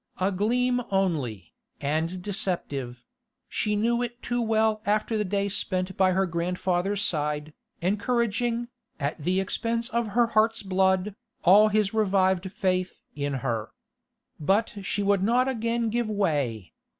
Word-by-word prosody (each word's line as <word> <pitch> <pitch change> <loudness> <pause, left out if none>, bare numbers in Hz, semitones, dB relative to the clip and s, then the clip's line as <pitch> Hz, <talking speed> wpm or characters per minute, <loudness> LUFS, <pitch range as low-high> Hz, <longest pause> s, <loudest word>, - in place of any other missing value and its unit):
A 190 +2 +2
gleam 245 +6 +1
only, 160 - -1 0.3
and 160 +5 -1
deceptive; 145 - -3 0.4
she 210 0 -1
knew 235 +3 +1
it 240 0 -4
too 240 0 -1
well 220 -1 +2
after 215 +1 0
the 210 - +1
day 200 0 0
spent 185 -1 -1
by 190 -2 +3
her 190 +1 +2
grandfather's 180 +3 -1
side, 150 -3 -1 0.3
encouraging, 235 +4 0 0.3
at 145 +2 -3
the 185 +4 +1
expense 230 +5 -1
of 235 -2 0
her 240 - +6
heart's 225 +1 +3
blood, 190 +1 +1 0.3
all 205 +4 +7
his 210 0 +1
revived 190 -3 +2
faith 185 -3 -1
in 145 -1 -2
her. 115 -4 -1 0.7
But 195 +9 +1
she 195 +1 -1
would 200 -1 +2
not 240 +6 +3
again 230 -2 -1
give 235 -1 0
way. 145 - -1
195 Hz, 140 wpm, -26 LUFS, 180-220 Hz, 0.7 s, all